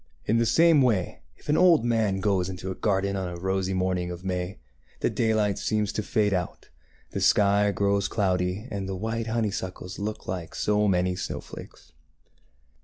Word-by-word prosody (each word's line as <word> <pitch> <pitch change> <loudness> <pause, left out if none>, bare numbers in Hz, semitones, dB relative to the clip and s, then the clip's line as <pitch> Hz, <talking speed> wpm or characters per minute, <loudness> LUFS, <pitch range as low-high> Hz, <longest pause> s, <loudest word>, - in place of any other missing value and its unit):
In 115 +2 +2
the 115 - +2
same 165 0 +5
way, 110 -9 +1 0.2
if - - -20
an 150 - +2
old 175 -8 +5
man 110 -5 +1
goes 95 -2 +1
into 95 0 -5
a - - -2
garden 100 0 0
on 95 -1 -2
a 85 0 -7
rosy 95 +1 -1
morning 90 -1 0
of 90 +1 -7
May, 90 0 -3 0.4
the - - +1
daylight 110 -3 +1
seems 105 -1 -1
to - - -1
fade 105 -1 +1
out, 90 -2 -4 0.4
the - - -3
sky 100 0 +4
grows 100 0 +1
cloudy, 95 +1 -1
and 95 -1 -4
the 95 - -3
white 115 +3 -3
honeysuckles 95 -5 -3
look 105 +1 -5
like 90 -3 -5
so 105 0 +1
many 90 -1 +1
snowflakes. - - -8
100 Hz, 175 wpm, -26 LUFS, 95-110 Hz, 0.4 s, same